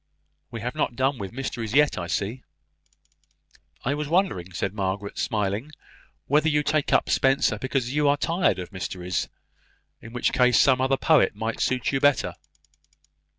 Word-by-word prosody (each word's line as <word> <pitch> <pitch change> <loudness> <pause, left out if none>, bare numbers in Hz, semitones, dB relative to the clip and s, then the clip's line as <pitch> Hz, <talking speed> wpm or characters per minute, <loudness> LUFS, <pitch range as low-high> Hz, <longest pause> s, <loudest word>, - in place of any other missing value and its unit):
We 115 -3 -7
have 125 +2 -3
not 120 - -1
done 130 0 0
with 95 -2 -5
mysteries 120 -3 -4
yet, 150 0 +4
I 90 -4 -4
see." 100 +8 -2 1.4
"I 135 - +1
was 150 0 -3
wondering," 160 - 0
said 95 +2 -3
Margaret 100 0 -3
smiling, 105 +6 -2 0.5
"whether 150 +3 +3
you 150 -1 +1
take 155 -1 0
up - - +3
Spenser 135 -5 +2
because 130 0 -2
you 150 0 +2
are 145 0 +3
tired 170 +4 +1
of 90 0 -7
mysteries. 90 -1 -3 0.7
In 115 - -11
such 125 - 0
a - - -20
case, 125 -2 +4
some 130 -2 +4
other 135 +1 +2
poet 155 -8 +3
might 110 +2 -3
suit 130 -1 0
you 135 - 0
better." 145 -4 +2
125 Hz, 165 wpm, -25 LUFS, 105-145 Hz, 1.4 s, yet